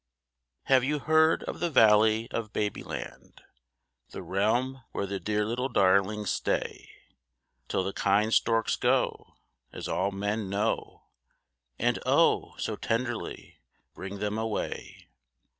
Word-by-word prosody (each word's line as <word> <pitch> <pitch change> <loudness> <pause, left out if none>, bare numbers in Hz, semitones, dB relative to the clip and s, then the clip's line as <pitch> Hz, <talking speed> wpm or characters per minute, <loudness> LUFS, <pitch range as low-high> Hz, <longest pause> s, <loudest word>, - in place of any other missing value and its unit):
Have 130 -2 +4
you 150 +3 0
heard 160 +2 +3
of - - -6
the 175 - 0
Valley 110 -3 +5
of 110 -2 -4
Babyland, 105 -1 -5 0.7
The - - -8
realm 120 +7 0
where 100 - -2
the 100 0 -4
dear 105 +1 -1
little 125 +4 -2
darlings 100 0 +2
stay, - - -2 0.8
Till 95 - 0
the 95 +1 -3
kind 105 +3 +2
storks 115 -1 +2
go, - - 0 0.4
as - - -6
all 95 +2 0
men 105 +1 -3
know, 105 +3 -2 0.7
And, - - +1
oh, - - +2
so - - -3
tenderly 120 +1 -4 0.3
bring 95 +1 -7
them 105 +2 -2
away? 110 -1 -4
110 Hz, 125 wpm, -28 LUFS, 100-120 Hz, 0.8 s, Valley